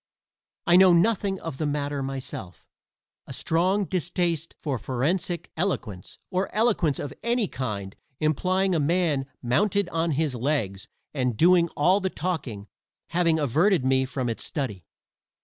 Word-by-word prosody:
I 175 Hz, 0 st, +6 dB
know 185 Hz, -1 st, +7 dB
nothing 195 Hz, +1 st, +2 dB
of 165 Hz, -5 st, -6 dB
the 155 Hz, -, 0 dB
matter 145 Hz, -1 st, -2 dB
myself, 135 Hz, -10 st, -6 dB, 0.6 s
a -, -, -7 dB
strong 185 Hz, +5 st, +1 dB
distaste 175 Hz, -3 st, -1 dB
for 140 Hz, -6 st, -2 dB
forensic 165 Hz, -, -1 dB
eloquence, 130 Hz, -, -3 dB
or 185 Hz, +1 st, -1 dB
eloquence 210 Hz, -, +2 dB
of 145 Hz, -, -5 dB
any 235 Hz, -2 st, +1 dB
kind 105 Hz, -, -4 dB, 0.2 s
implying 185 Hz, +5 st, +1 dB
a 165 Hz, -, +2 dB
man 150 Hz, -3 st, +1 dB, 0.2 s
mounted 200 Hz, -, +2 dB
on 165 Hz, -1 st, 0 dB
his 150 Hz, -1 st, 0 dB
legs 115 Hz, -7 st, -1 dB, 0.3 s
and 125 Hz, -5 st, -1 dB
doing 170 Hz, +2 st, +5 dB
all 180 Hz, +7 st, +4 dB
the 190 Hz, -1 st, -1 dB
talking, 135 Hz, -, -4 dB, 0.4 s
having 170 Hz, -2 st, +2 dB
averted 155 Hz, -, +2 dB
me 130 Hz, 0 st, +3 dB
from 130 Hz, -1 st, -3 dB
its 115 Hz, -, -3 dB
study. 125 Hz, -, -4 dB
160 Hz, 140 wpm, -26 LUFS, 130-180 Hz, 0.6 s, know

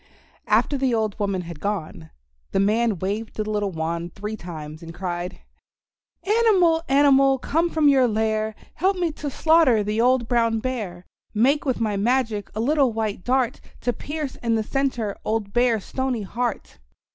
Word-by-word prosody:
After 280 Hz, -, +2 dB
the 260 Hz, -3 st, +1 dB
old 215 Hz, -2 st, -1 dB
woman 200 Hz, -3 st, -1 dB
had 170 Hz, -3 st, -9 dB
gone, 160 Hz, -, -4 dB, 0.4 s
the -, -, +2 dB
man 215 Hz, +1 st, +2 dB
waved 205 Hz, +5 st, -3 dB
the 215 Hz, -1 st, -3 dB
little 205 Hz, -2 st, -1 dB
wand 170 Hz, +1 st, -4 dB
three 210 Hz, +2 st, -4 dB
times, 155 Hz, -5 st, -8 dB
and 165 Hz, 0 st, -9 dB
cried: 175 Hz, -1 st, -4 dB, 0.8 s
"Animal, 390 Hz, -7 st, +3 dB
animal, 275 Hz, -1 st, +5 dB
come 325 Hz, +6 st, 0 dB
from 315 Hz, -3 st, +2 dB
your 265 Hz, -3 st, +5 dB
lair, 220 Hz, -1 st, 0 dB, 0.2 s
Help 380 Hz, +1 st, +1 dB
me 345 Hz, -2 st, 0 dB
to 295 Hz, -1 st, -5 dB
slaughter 305 Hz, -7 st, +4 dB
the 210 Hz, +2 st, 0 dB
old 250 Hz, -1 st, +3 dB
Brown 230 Hz, -1 st, +2 dB
Bear! 215 Hz, -8 st, -4 dB, 0.3 s
Make 270 Hz, +8 st, +3 dB
with 255 Hz, -, 0 dB
my 215 Hz, -3 st, 0 dB
magic 225 Hz, -1 st, 0 dB
a -, -, -3 dB
little 275 Hz, +1 st, +2 dB
white 215 Hz, -4 st, -3 dB
dart, 255 Hz, -1 st, 0 dB, 0.2 s
To 245 Hz, -, 0 dB
pierce 295 Hz, +1 st, -5 dB
in 230 Hz, -1 st, 0 dB
the 220 Hz, -, 0 dB
centre 245 Hz, -5 st, -1 dB
old 215 Hz, -2 st, -2 dB
Bear's 240 Hz, -4 st, +2 dB
Stony 260 Hz, -4 st, -2 dB
Heart!" 230 Hz, -, -4 dB
225 Hz, 165 wpm, -23 LUFS, 200-265 Hz, 0.8 s, animal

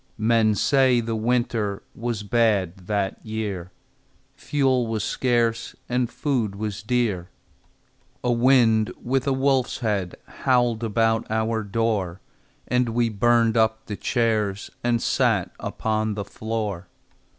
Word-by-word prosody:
Men 110 Hz, -1 st, +3 dB
say 130 Hz, +3 st, +3 dB
the 115 Hz, -1 st, -2 dB
winter 110 Hz, -3 st, 0 dB
Was 115 Hz, -3 st, -3 dB
bad 100 Hz, -5 st, +1 dB
that 100 Hz, -2 st, -2 dB
year; 105 Hz, -5 st, -4 dB, 0.6 s
Fuel 130 Hz, -4 st, +1 dB
was 110 Hz, -2 st, -2 dB
scarce, 120 Hz, -2 st, 0 dB
And 125 Hz, -1 st, 0 dB
food 125 Hz, -9 st, -1 dB
was 105 Hz, 0 st, -4 dB
dear. 105 Hz, -6 st, -1 dB, 0.9 s
A 125 Hz, -, +1 dB
wind 120 Hz, -3 st, +4 dB
with 130 Hz, +2 st, -1 dB
a -, -, +3 dB
wolf's 130 Hz, -2 st, +1 dB
head 100 Hz, -6 st, -1 dB
Howled 120 Hz, -3 st, +1 dB
about 115 Hz, 0 st, +1 dB
our 110 Hz, +1 st, 0 dB
door, 100 Hz, -4 st, -1 dB, 0.5 s
And 125 Hz, -1 st, +1 dB
we 120 Hz, -1 st, +2 dB
burned 115 Hz, +1 st, +3 dB
up 110 Hz, -1 st, +1 dB
the 105 Hz, -, -5 dB
chairs 110 Hz, -4 st, -1 dB
And 120 Hz, -1 st, +1 dB
sat -, -, +1 dB
upon 110 Hz, -1 st, -1 dB
the 100 Hz, -1 st, -4 dB
floor. 105 Hz, -5 st, -4 dB
115 Hz, 125 wpm, -24 LUFS, 105-120 Hz, 0.9 s, wind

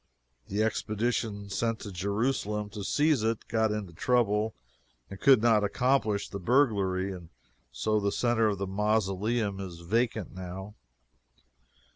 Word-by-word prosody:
The 105 Hz, +2 st, 0 dB
expedition 110 Hz, -2 st, -1 dB
sent 115 Hz, +2 st, -1 dB
to 100 Hz, -, -7 dB
Jerusalem 105 Hz, +2 st, -1 dB
to 105 Hz, -1 st, -6 dB
seize 150 Hz, +3 st, +2 dB
it 115 Hz, 0 st, -1 dB
got 110 Hz, -1 st, +1 dB
into 105 Hz, -5 st, -4 dB
trouble 110 Hz, -, +1 dB, 0.6 s
and 95 Hz, -, -8 dB
could 130 Hz, -5 st, +6 dB
not 110 Hz, -3 st, +4 dB
accomplish 110 Hz, -1 st, +1 dB
the 100 Hz, -, -6 dB
burglary, 100 Hz, -5 st, +2 dB
and 85 Hz, -3 st, -10 dB, 0.4 s
so 110 Hz, 0 st, 0 dB
the 100 Hz, 0 st, 0 dB
centre 120 Hz, -1 st, +2 dB
of 100 Hz, -2 st, 0 dB
the 100 Hz, -, -2 dB
mausoleum 105 Hz, +1 st, 0 dB
is 90 Hz, -3 st, -7 dB
vacant 110 Hz, +3 st, -1 dB
now. 95 Hz, +2 st, -7 dB
105 Hz, 135 wpm, -29 LUFS, 100-115 Hz, 0.6 s, could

